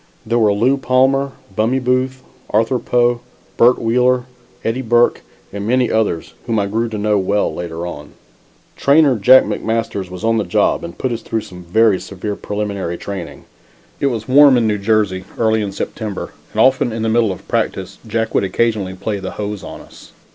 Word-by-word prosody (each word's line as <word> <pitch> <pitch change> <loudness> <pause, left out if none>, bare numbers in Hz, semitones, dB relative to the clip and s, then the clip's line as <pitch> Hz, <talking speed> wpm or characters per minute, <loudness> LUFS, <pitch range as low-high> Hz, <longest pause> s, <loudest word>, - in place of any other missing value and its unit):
There 115 +2 +1
were 105 -2 +4
Lew 120 +7 +2
Palmer, 135 +1 +2 0.2
Bummie 115 +5 +1
Booth, 130 +1 -1 0.3
Arthur 115 +4 +1
Poe, 120 0 +1 0.4
Bert 120 +2 +5
Wheeler, 125 +2 +2 0.4
Eddie 115 +3 -1
Burke 120 0 +2 0.3
and 100 +1 -4
many 125 0 +2
others 105 -7 -1
whom 115 -2 0
I 100 - +1
grew 115 +4 -1
to 110 - -5
know 105 0 +1
well 100 +2 0
later 85 -1 -5
on. 75 -4 -8 0.6
Trainer 140 -1 +4
Jack 130 +6 +7
McMasters 115 -4 -2
was 90 +2 -9
on 115 0 +2
the - - 0
job 90 - +1
and 85 - -8
put 130 - -2
us 115 -1 -3
through 110 0 -3
some 90 -3 -11
very 105 +3 +3
severe 100 +1 -5
preliminary 100 -5 -4
training. 85 -8 -7 0.5
It 140 - +1
was 115 -4 -3
warm 140 0 +7
in 120 - +2
New 105 -2 0
Jersey 100 -3 +1
early 110 -1 +2
in 100 -2 -3
September, 105 0 -5 0.2
and - - -4
often 130 -2 +3
in 110 0 -3
the - - 0
middle 110 -2 +2
of 95 - -9
practice - - -2
Jack 115 -1 -2
would - - +2
occasionally 100 -2 -1
play 100 +2 -3
the 95 -1 -6
hose 105 -2 -4
on - - -8
us. - - -16
110 Hz, 185 wpm, -18 LUFS, 100-125 Hz, 0.6 s, Jack